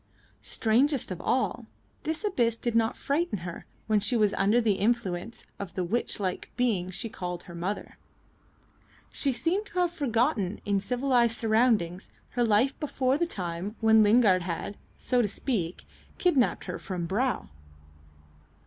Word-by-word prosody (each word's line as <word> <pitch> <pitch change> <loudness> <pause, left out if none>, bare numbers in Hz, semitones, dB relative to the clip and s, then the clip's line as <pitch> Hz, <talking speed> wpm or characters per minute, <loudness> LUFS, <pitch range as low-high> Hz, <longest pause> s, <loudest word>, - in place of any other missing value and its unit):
Strangest 255 +2 +1
of 180 - -5
all, 260 +1 0 0.4
this 320 +5 -2
abyss 240 - +1
did 240 0 -2
not 225 0 +2
frighten 285 -5 0
her 175 - -7 0.2
when 215 -1 +3
she 210 +4 0
was 210 -2 +3
under 210 +5 +3
the 225 -3 +3
influence 210 -2 -1
of 195 -4 -6
the 185 - 0
witch 225 +6 -1
like 185 -3 -3
being 215 -8 +1
she 195 +5 -5
called 180 -4 -5
her 175 - -11
mother. 180 +5 -4 1.1
She 280 - 0
seemed 340 - -1
to 365 - -10
have 350 -1 +2
forgotten 235 - 0
in 200 -1 +2
civilised 245 +1 +2
surroundings 220 -6 +2 0.2
her 245 - 0
life 230 +4 +3
before 275 -2 0
the 345 - +1
time 180 - -4
when 220 -1 +6
Lingard 210 -3 +5
had, 175 +3 -4 0.2
so 250 -1 +1
to 220 - +1
speak, 195 -5 -3 0.3
kidnapped 300 -9 +2
her - - -5
from 180 -4 -4
Brow. 240 +9 -1
225 Hz, 150 wpm, -28 LUFS, 195-255 Hz, 1.1 s, when